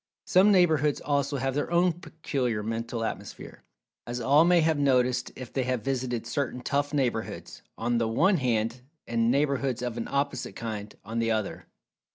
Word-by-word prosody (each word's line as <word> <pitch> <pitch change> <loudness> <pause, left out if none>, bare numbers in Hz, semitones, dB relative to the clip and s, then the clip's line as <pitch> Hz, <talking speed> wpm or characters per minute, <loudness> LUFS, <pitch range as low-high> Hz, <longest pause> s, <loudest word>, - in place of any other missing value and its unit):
Some 190 +3 +5
neighborhoods, 155 -6 +3
also, 140 -1 0
have 135 0 -1
their 145 +2 -1
own 175 +1 +3
peculiar 145 - -3
Mental[Pg 115 +1 -3
226] 115 -1 -1
Atmosphere, - - -11 0.4
as 120 +1 -3
all 140 +6 +5
may 175 -1 +5
have 160 -2 +2
noticed 125 -3 +2
if 130 -3 -9
they 135 - 0
have 125 -3 -1
visited 125 -3 -2
certain 125 0 -2
"tough" 145 +2 -1
neighborhoods, 125 -6 -2 0.2
on 120 -1 0
the 115 - +1
one 180 - +3
hand, 120 -2 0 0.2
and 115 0 +1
neighborhoods 135 -2 +1
of 120 -1 -3
an 115 - -3
opposite 140 -2 -2
kind, 105 -2 -5
on 115 +1 -3
the 115 0 +1
other. 110 -2 -2
130 Hz, 175 wpm, -27 LUFS, 115-145 Hz, 0.4 s, Some